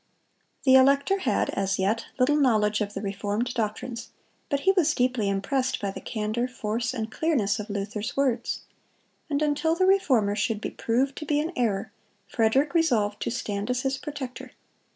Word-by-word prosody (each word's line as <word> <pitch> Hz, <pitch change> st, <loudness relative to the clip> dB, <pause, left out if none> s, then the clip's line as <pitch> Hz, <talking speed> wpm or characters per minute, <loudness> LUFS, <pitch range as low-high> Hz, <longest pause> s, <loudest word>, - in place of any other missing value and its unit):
The 260 Hz, -, +5 dB
elector 280 Hz, +8 st, +5 dB
had, -, -, 0 dB
as 195 Hz, -1 st, -1 dB
yet, 205 Hz, +4 st, 0 dB
little 270 Hz, +3 st, +3 dB
knowledge 215 Hz, -7 st, +2 dB
of 205 Hz, 0 st, -3 dB
the -, -, -4 dB
reformed 205 Hz, +4 st, -2 dB
doctrines, 230 Hz, +2 st, -3 dB, 0.4 s
but 280 Hz, -1 st, 0 dB
he 385 Hz, -, +4 dB
was 330 Hz, -6 st, +2 dB
deeply 250 Hz, -5 st, +1 dB
impressed 255 Hz, +7 st, 0 dB
by 200 Hz, -1 st, -2 dB
the -, -, -8 dB
candor, 220 Hz, +2 st, -2 dB
force, 230 Hz, -1 st, -2 dB
and 225 Hz, -3 st, -4 dB
clearness 235 Hz, -11 st, +1 dB
of 210 Hz, +1 st, -6 dB
Luther's 205 Hz, +3 st, -4 dB
words; 265 Hz, -4 st, 0 dB, 0.7 s
and 290 Hz, 0 st, 0 dB
until 300 Hz, +2 st, +1 dB
the 370 Hz, +2 st, +2 dB
Reformer 260 Hz, -, +3 dB
should 220 Hz, 0 st, 0 dB
be -, -, -4 dB
proved 260 Hz, +4 st, 0 dB
to 305 Hz, -, -5 dB
be 295 Hz, 0 st, +2 dB
in 320 Hz, +4 st, -2 dB
error, 210 Hz, -6 st, 0 dB, 0.4 s
Frederick 250 Hz, -, +2 dB
resolved 230 Hz, -12 st, +2 dB
to -, -, -1 dB
stand 205 Hz, -3 st, -3 dB
as 250 Hz, 0 st, 0 dB
his 270 Hz, 0 st, -1 dB
protector. 280 Hz, -4 st, -7 dB
245 Hz, 170 wpm, -26 LUFS, 210-280 Hz, 0.7 s, The